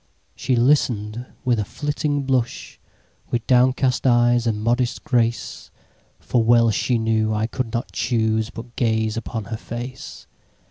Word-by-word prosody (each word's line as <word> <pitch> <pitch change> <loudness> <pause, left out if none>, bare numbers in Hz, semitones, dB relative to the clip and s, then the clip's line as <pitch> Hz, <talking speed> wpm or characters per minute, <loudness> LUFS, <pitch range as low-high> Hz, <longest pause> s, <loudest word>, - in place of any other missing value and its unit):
She 130 - 0
listen'd 120 -3 +1 0.2
with 120 -3 +2
a - - +1
flitting 145 +3 -2
blush, 130 -3 -2 0.5
With 120 -1 -2
downcast 130 +1 +2
eyes 120 -1 +3
and 110 -2 0
modest 120 +3 0
grace; 120 -5 -1 0.5
For 120 -2 0
well 115 0 +4
she 120 +3 0
knew, 110 -1 +1
I 105 +1 0
could 120 0 -4
not 115 -4 -3
chooseBut 110 +2 -1
gaze 110 -2 0
upon 115 -1 -4
her - - -2
face. 120 +3 -8
120 Hz, 135 wpm, -22 LUFS, 110-125 Hz, 0.5 s, well